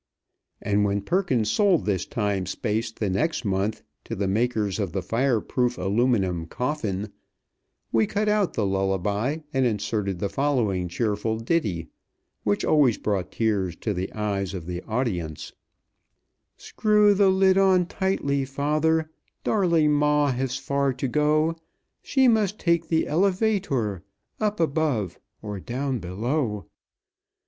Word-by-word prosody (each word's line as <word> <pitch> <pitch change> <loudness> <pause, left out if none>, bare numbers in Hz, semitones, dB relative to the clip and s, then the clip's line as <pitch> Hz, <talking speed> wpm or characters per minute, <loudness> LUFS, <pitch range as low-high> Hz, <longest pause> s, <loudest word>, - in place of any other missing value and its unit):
And 105 0 +2
when 100 0 0
Perkins 130 - +1
sold 200 -6 +3
this 100 -4 -1
time 100 -4 -1
space 110 +2 -2
the 110 -2 -3
next 125 - -1
month 100 +2 -1 0.2
to 115 - -4
the 100 -1 -1
makers 110 -1 0
of 95 -5 -2
the 95 -2 -2
Fireproof 120 +2 0
Aluminum 95 -4 +1
Coffin, 110 - -3 0.8
we 110 -2 +3
cut 210 +1 -1
out 210 -3 +1
the 105 - +1
lullaby, 100 - 0
and 135 -1 +2
inserted 105 -4 -1
the 100 - -1
following 105 -6 0
cheerful 105 +4 -1
ditty, 110 - -1 0.5
which 100 -1 0
always 140 -7 +4
brought 100 -4 -2
tears 100 -6 0
to 105 - -3
the 95 +1 -3
eyes 100 -2 -2
of 90 -3 -6
the 90 0 -4
audience: 100 - -3 1.0
"Screw 210 -1 +3
the 200 -1 +4
lid 190 0 +4
on 190 -2 +4
tightly, 170 -7 -1
father, 155 +4 0 0.3
Darling 170 -7 +3
ma 150 -1 +3
has 130 0 -2
far 140 0 0
to 130 +2 -3
go; 155 +4 +2 0.5
She 265 -2 +3
must 215 -3 +2
take 170 -2 +1
the 160 0 +1
elevator 180 - +1 0.4
Up 210 -1 -1
above 140 - 0 0.2
or 105 -2 -5
down 130 +4 -3
below. 105 - -2
120 Hz, 135 wpm, -25 LUFS, 100-155 Hz, 1.0 s, always